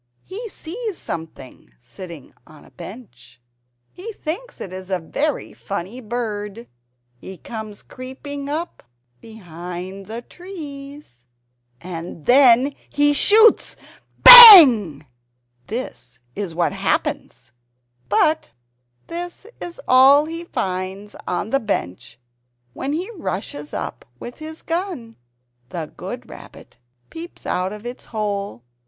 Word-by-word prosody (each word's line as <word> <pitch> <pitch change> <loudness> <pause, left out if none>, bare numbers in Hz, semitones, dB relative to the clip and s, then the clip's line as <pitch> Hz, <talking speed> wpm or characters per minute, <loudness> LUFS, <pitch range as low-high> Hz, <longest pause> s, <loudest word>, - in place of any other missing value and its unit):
He 445 +4 -8
sees 410 +4 -7
something 145 - -10
sitting 165 - -12
on 155 -1 -18
a - - -21
bench. 170 - -13 0.5
He 415 +6 -9
thinks 400 +10 -7
it 185 - -8
is 185 0 -9
a 190 - -1
very 280 - -4
funny 200 +5 -7
bird! 220 -1 -6 0.5
He 190 +6 -11
comes 215 -1 -10
creeping 280 +2 -9
up 325 +4 -5 0.4
behind 180 -2 -10
the 230 +3 -7
trees. 285 - -12 0.5
And 170 -2 -9
then 260 +1 +4 0.2
he 290 0 +1
shoots 440 +9 +4 0.5
BANG! 275 - +11 0.6
This 125 - -8 0.2
is 195 -5 -6
what 170 0 -1
happens 120 - -4 0.6
But 315 0 +1 0.6
this 350 +3 -8
is 345 -1 -9
all 270 +3 +5
he 330 +2 -8
finds 190 - -5
on 205 +4 -4
the 275 - +1
bench 160 - -5 0.6
when 275 - -5
he 360 +8 -4
rushes 150 - -6
up - - -7 0.2
with 245 - -10
his 315 +1 -10
gun. 330 -10 -5 0.5
The 160 0 -7
good - - -8
Rabbit - - -15 0.3
peeps 335 +2 -11
out 185 +1 -2
of 210 +2 -10
its 245 +1 -9
hole 200 - -5
230 Hz, 115 wpm, -20 LUFS, 185-310 Hz, 0.6 s, BANG